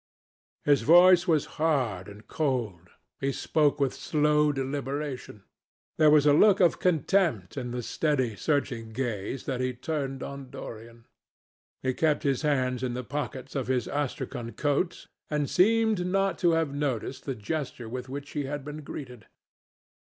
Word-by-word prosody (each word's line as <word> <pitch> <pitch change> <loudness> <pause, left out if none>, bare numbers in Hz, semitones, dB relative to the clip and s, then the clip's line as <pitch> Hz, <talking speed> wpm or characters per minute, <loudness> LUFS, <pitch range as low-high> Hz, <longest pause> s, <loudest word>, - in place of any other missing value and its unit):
His 145 -1 +4
voice 175 +3 +6
was 155 -4 +3 0.2
hard 125 - +1
and 105 +1 -13
cold. 115 - -2 0.3
He 135 0 0
spoke 145 +1 +1
with 135 -2 +1
slow 150 0 +2
deliberation. 135 -4 -4 0.6
There 155 -1 +7
was 150 -1 +5
a 145 - +6
look 200 +6 +5
of 175 -3 +3
contempt 165 - +1
in 125 -3 -4
the 120 0 -4
steady 130 -5 0
searching 120 -5 -1
gaze 120 -1 -3
that 130 -2 -2
he 130 -1 -1
turned 135 0 -3
on 140 -2 -7
Dorian. 115 0 -10 0.8
He 130 0 +1
kept 155 +1 +1
his 135 -3 +1
hands 130 -4 0
in 125 -2 -2
the 125 - -4
pockets 135 -1 -5
of 130 -4 -2
his 125 -3 0
Astrakhan 130 -4 -3
coat, 150 +5 -1 0.2
and 150 -2 0
seemed 220 +1 +3
not 195 -1 0
to 175 -2 +3
have 165 -3 0
noticed 135 -2 -3
the 135 - -3
gesture 125 +1 -4
with 125 +2 -6
which 145 +1 -6
he 145 -2 -2
had 140 0 -5
been 150 +1 -6
greeted. 125 -5 -9
140 Hz, 155 wpm, -28 LUFS, 125-150 Hz, 0.8 s, There